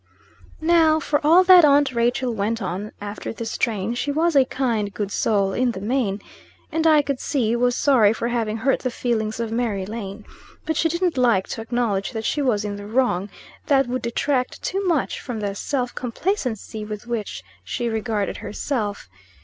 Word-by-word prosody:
Now, 320 -1 +4
for 295 -1 0
all 335 +5 +6
that 365 -2 +8
aunt 285 -2 +4
Rachel 240 +1 +1
went 220 +2 -1
on 195 +1 -4
after 205 +1 -6
this 225 0 -5
strain, 220 -2 -1
she 265 +4 -2
was 325 +2 +1
a 270 -2 +6
kind, 230 -6 -1
good 195 +1 -4
soul, 200 -3 +1
in 245 +1 +1
the 190 - -6
main, 210 -2 -1 0.5
and 325 +1 +1
I 305 -2 +5
could 280 -2 -2
see, 235 -6 0
was 245 0 +2
sorry 245 -9 +4
for 230 +1 -2
having 225 -2 -1
hurt 260 +4 +1
the 255 - -2
feelings 230 -3 -2
of 230 -1 -2
Mary 225 -5 -1
Lane. 210 -1 -7 0.4
But 320 - -1
she 325 - +2
didn't 340 -3 0
like 235 -7 +3
to 225 - -4
acknowledge 225 -2 -1
that 220 -1 -4
she 295 - 0
was 220 -6 +1
in 205 -1 -4
the 205 0 -8
wrong; 210 -5 +1 0.4
that 275 -1 +4
would 250 +1 -3
detract 250 +2 -1
too 390 +2 -1
much 325 -6 0
from 240 -3 -5
the 205 -1 -2
self 250 +4 -2
complacency 245 - -3
with 210 +1 -7
which 235 -3 -4 0.2
she 240 - -3
regarded 220 -2 -2
herself. 210 - -3
235 Hz, 185 wpm, -22 LUFS, 215-275 Hz, 0.5 s, that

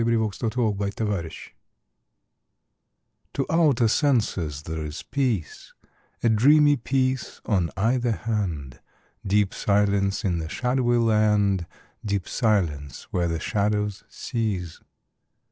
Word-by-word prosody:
fi4S] 115 0 0
II 125 - +3
LA 110 - +2
FUITE 100 0 -3
DE - - -3
LA 105 - 0
LUNE 85 -4 -4 2.0
TO 135 - -1
outer 150 -8 +4
senses 105 - +1
there 80 0 -4
is 75 +1 -6
peace, 120 - -2 0.5
A 115 - +4
dreamy 145 +7 +5
peace 130 0 -1
on 90 -6 +1
either 120 +3 +1
hand, 90 - -3 0.4
Deep 100 -1 +1
silence 100 -1 +1
in 90 -3 0
the 80 0 -5
shadowy 125 +1 +1
land, 105 -5 +2 0.4
Deep 100 -3 -2
silence 85 - 0
where 90 -1 0
the 80 -1 -2
shadows 105 +2 -1
cease. 100 - -3
105 Hz, 120 wpm, -25 LUFS, 95-120 Hz, 2.0 s, dreamy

